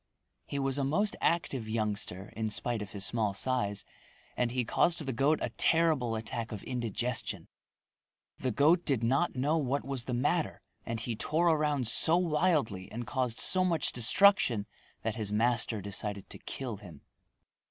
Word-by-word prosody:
He 140 - -4
was 135 0 0
a - - +1
most 195 +10 0
active 135 -9 0
youngster 105 -3 -2
in 110 -1 -2
spite 115 +1 -1
of 105 - -7
his 100 -1 -1
small 105 -4 0
size 110 -4 0 0.5
and 125 -1 +1
he 125 0 -1
caused 165 +5 +1
the 135 - -2
goat 140 +6 +2
a - - -2
terrible 155 -8 +2
attack 110 +1 -4
of 105 -3 -6
indigestion. 120 0 -2 0.9
The 130 - -1
goat 155 - +3
did 135 -6 0
not 135 +8 +1
know 145 +5 +1
what 140 -1 -1
was 135 -3 -4
the 125 - -2
matter 150 +6 0 0.2
and 115 -1 -2
he 115 0 -3
tore 160 +9 +1
around 150 -5 +1
so 160 +8 +5
wildly 150 - 0
and 120 +2 -5
caused 125 -1 -2
so 185 -1 +3
much 170 -3 +2
destruction 120 - +4 0.4
that 110 - -1
his 105 -2 -3
master 115 0 +1
decided 100 0 -5
to - - -8
kill 125 -6 -5
him. 90 -8 -12
125 Hz, 165 wpm, -30 LUFS, 110-150 Hz, 0.9 s, so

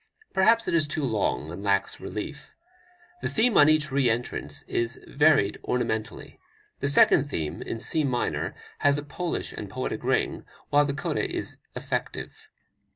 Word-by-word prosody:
Perhaps 225 +4 +4
it - - 0
is 160 -3 +3
too 150 0 -3
long 100 - 0
and 90 +3 -7
lacks 100 -1 +1
relief. 150 +8 -6 0.7
The - - -1
theme 230 0 +2
on 145 - +7
each 155 -1 +2
re 135 -2 +3
entrance 115 +2 -3
is 120 +1 -2
varied 145 -8 +3
ornamentally. 115 -3 -3 0.4
The 140 - -1
second 145 0 +5
theme, 80 - -3
in 115 - -4
C 155 +6 0
minor, 125 -3 -1 0.2
has 145 0 +3
a 145 - -4
Polish 170 +3 -4
and - - -6
poetic - - -4
ring, - - 0 0.3
while 145 0 +5
the 140 -1 -2
coda - - -1
is - - -4 0.2
effective. - - -4
140 Hz, 160 wpm, -26 LUFS, 110-155 Hz, 0.7 s, on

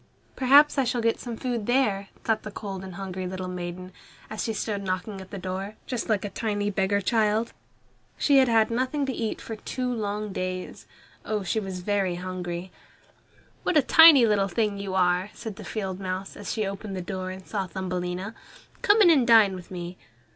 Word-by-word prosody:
"Perhaps 280 +3 +6
I - - +4
shall 245 0 -1
get 230 0 +1
some 235 -2 -6
food 240 -4 -3
here," 210 -7 +2 0.2
thought 225 -1 +1
the 215 - -7
cold 195 -2 -6
and 190 -2 -8
hungry 190 -1 -5
little 185 0 -5
maiden, 180 0 -6 0.4
as 220 - -3
she 225 - -1
stood 210 -1 -2
knocking 190 +1 -3
at 190 - -11
the 200 - -6
door, 190 +3 -5
just 245 -3 -3
like 210 -2 +1
a 205 - -5
tiny 205 -2 -1
beggar 195 +1 +1
child. 220 +2 +1 0.6
She 280 -1 +5
had 260 - +5
had 225 -1 +3
nothing 260 +4 0
to 265 - -2
eat 225 -2 -3
for 225 - -6
two 250 +3 -3
long 210 -2 -3
days. 185 0 -5 0.4
Oh, 210 -2 -2
she 205 +4 0
was 190 -3 -5
very 195 -2 0
hungry! 180 0 -5 0.9
"What 340 - +1
a 295 - +5
tiny 320 -6 +8 0.2
thing 205 +1 -1
you 195 -1 -4
are!" 180 +1 +2
said 220 -4 -7
the - - -8
field 190 -4 -4
mouse, 190 0 -4
as 205 - -5
she 215 -2 -1
opened 195 +1 -5
the 185 - -3
door 185 0 -4
and 185 0 -8
saw 195 -3 -3
Thumbelina. 180 +2 -4 0.5
"Come 435 -2 +5
in 350 - +7
and 270 -7 +4
dine 220 -4 +7
with 180 -2 -9
me." 175 0 -7
200 Hz, 195 wpm, -26 LUFS, 185-230 Hz, 0.9 s, tiny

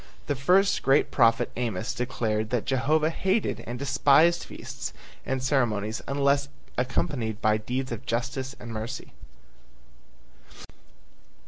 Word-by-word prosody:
The 145 - -1
first 185 +9 +3
great 135 +2 +3
prophet 115 -1 +3
Amos 115 -1 -2
declared 110 -4 -1
that 120 -2 -1
Jehovah 150 +4 +2
hated 190 +5 0
and 120 - -4
despised 140 +5 +4
feasts - - -7 0.3
and 130 -1 -1
ceremonies 115 -5 0
unless 140 0 +2 0.3
accompanied 125 -3 -1
by 110 -1 +3
deeds 125 +4 -3
of 115 +3 -6
justice 125 +3 -2
and 120 - -8
mercy. 115 +4 -6
130 Hz, 115 wpm, -27 LUFS, 115-140 Hz, 0.3 s, despised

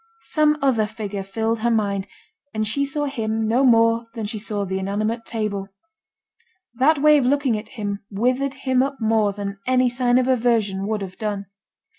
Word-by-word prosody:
Some 300 -1 +2
other 230 -6 +2
figure 210 -2 -5
filled 220 +4 -2
her 235 +2 +1
mind, 200 -4 0 0.5
and 215 0 0
she 280 +6 0
saw 290 +1 -2
him 225 -5 -2
no 240 +5 +2
more 230 -2 +4
than 225 -2 -3
she 215 +1 -4
saw 205 -2 -3
the 190 0 -2
inanimate 215 +4 -2
table. 210 -4 -2 1.1
That 275 +6 +3
way 300 +1 +5
of 260 - 0
looking 275 -3 +2
at 215 +1 -6
him 205 -1 -3
withered 255 +6 0
him 260 -1 +3
up 275 +1 -2
more 220 -2 +2
than 200 0 -6
any 255 -1 +3
sign 245 0 +2
of 255 0 +2
aversion 225 -6 +1
would 215 -2 -1
have 185 -1 -8
done. 205 -2 -3
225 Hz, 180 wpm, -22 LUFS, 205-255 Hz, 1.1 s, way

